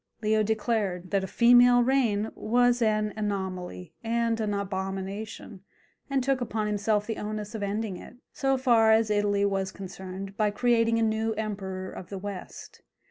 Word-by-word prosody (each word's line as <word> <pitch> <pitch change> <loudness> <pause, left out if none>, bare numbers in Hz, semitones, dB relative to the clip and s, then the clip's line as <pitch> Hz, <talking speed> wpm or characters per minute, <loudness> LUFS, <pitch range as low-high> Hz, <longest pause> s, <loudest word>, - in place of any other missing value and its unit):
Leo 215 0 +3
declared 210 -4 -1
that 195 -1 +1
a - - -3
female 245 +2 +6
reign 235 -5 +1
was 245 +2 +2
an 215 -1 +1
anomaly 190 - -4
and 230 0 0
an 215 -2 -1
abomination, 195 +1 -4 0.5
and 270 -2 +1
took 265 0 +1
upon 220 -3 -2
himself 210 0 0
the 225 - -4
onus 210 0 -5
of 220 - -5
ending 205 -1 -2
it, - - -12 0.2
so 270 0 +1
far 235 -4 +4
as 220 -1 +3
Italy 205 -1 +2
was 195 -1 -1
concerned, 190 +1 -8
by 210 0 +2
creating 230 +1 +2
a 230 - +2
new 220 0 0
emperor 195 -3 -4
of 180 - -9
the 195 - -5
West. 195 -1 -8
215 Hz, 160 wpm, -27 LUFS, 195-230 Hz, 0.5 s, female